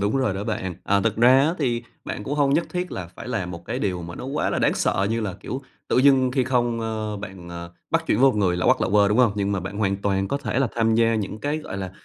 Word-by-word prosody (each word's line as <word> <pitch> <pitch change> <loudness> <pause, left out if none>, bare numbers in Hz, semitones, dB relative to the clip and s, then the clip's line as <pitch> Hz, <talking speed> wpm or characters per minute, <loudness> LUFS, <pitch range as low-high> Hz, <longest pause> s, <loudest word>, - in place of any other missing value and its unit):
Đúng 100 +5 +1
rồi 130 -7 +1
đó 100 +1 -4
bạn. 95 -5 -3
À, 100 0 +2
thực 110 0 0
ra 125 +3 +6
á 155 +5 +2
thì 120 -5 0 0.2
bạn 105 - -5
cũng 145 - -2
hông 140 -2 +2
nhất 165 +3 +1
thiết 180 0 -3
là 90 - -5
phải 90 - -10
làm 100 -8 -2
một 85 -1 -8
cái 120 +6 -3
điều 90 -7 -2
mà 85 +1 -7
nó - - -7
quá 140 +3 -1
là - - 0
đáng - - +2
sợ, 95 - +1
như 115 +1 0
là, 100 -4 -3
kiểu, 130 +6 -5 0.3
tự - - +2
dưng 130 -1 +5
khi 130 -1 +1
không, 120 -2 0
ơ, 110 -2 -3
bạn, 95 -3 -9
ờ, 85 0 -8 0.2
bắt - - +1
chuyện - - +2
với 135 0 +7
một 125 - -4
người 95 -4 +2
lạ 90 - -2
hoắc - - +4
lạ - - +1
huơ, 100 0 +4
đúng 105 +3 +1
hông? 120 -5 +5
Nhưng 100 -1 -1
mà 95 - -1
bạn 95 +3 -6
hoàn 100 -2 +1
toàn 95 -1 -1
có 140 - 0
thể 130 - -2
là 135 -2 +2
tham 115 -1 +2
gia 115 0 +3
những 105 0 -3
cái, 145 +2 -1
gọi 150 - -7
là, 95 -1 -4
110 Hz, 305 wpm, -23 LUFS, 95-130 Hz, 0.3 s, với